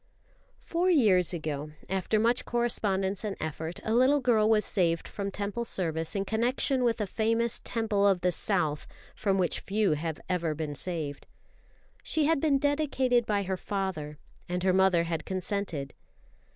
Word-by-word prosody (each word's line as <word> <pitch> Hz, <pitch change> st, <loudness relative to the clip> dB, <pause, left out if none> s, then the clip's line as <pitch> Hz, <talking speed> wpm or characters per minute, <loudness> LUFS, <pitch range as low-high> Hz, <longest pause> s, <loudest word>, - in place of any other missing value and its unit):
Four 350 Hz, +2 st, -1 dB
years 205 Hz, -, +4 dB
ago, 155 Hz, -3 st, -4 dB
after 190 Hz, +3 st, 0 dB
much 235 Hz, +3 st, +2 dB
correspondence 205 Hz, -5 st, 0 dB
and 205 Hz, -2 st, -3 dB
effort, 160 Hz, +2 st, -4 dB
a 220 Hz, -, -1 dB
little 260 Hz, +5 st, +4 dB
girl 225 Hz, -4 st, +3 dB
was 215 Hz, -1 st, +3 dB
saved 170 Hz, -4 st, 0 dB
from 200 Hz, -1 st, -4 dB
Temple 205 Hz, +4 st, -3 dB
service 165 Hz, -7 st, -3 dB
in 195 Hz, 0 st, -1 dB
connection 250 Hz, +4 st, 0 dB
with 235 Hz, -2 st, +1 dB
a 210 Hz, -, 0 dB
famous 230 Hz, +3 st, 0 dB
Temple 215 Hz, -3 st, +1 dB
of 190 Hz, -3 st, +2 dB
the 180 Hz, -, +2 dB
South 165 Hz, -6 st, 0 dB, 0.3 s
from 195 Hz, -2 st, 0 dB
which 180 Hz, -3 st, +1 dB
few 210 Hz, -1 st, 0 dB
have 155 Hz, 0 st, -2 dB
ever 170 Hz, -4 st, -1 dB
been 155 Hz, -1 st, -4 dB
saved. 155 Hz, -2 st, -4 dB, 0.7 s
She 310 Hz, -2 st, +1 dB
had 320 Hz, -2 st, +2 dB
been 295 Hz, -3 st, +3 dB
dedicated 270 Hz, -4 st, +1 dB
by 205 Hz, -1 st, +1 dB
her 190 Hz, 0 st, -2 dB
father, 180 Hz, -7 st, -4 dB, 0.3 s
and 180 Hz, 0 st, -2 dB
her 185 Hz, -1 st, +3 dB
mother 190 Hz, -2 st, +4 dB
had 165 Hz, -1 st, -3 dB
consented. 185 Hz, -6 st, -3 dB
195 Hz, 160 wpm, -29 LUFS, 170-230 Hz, 0.7 s, years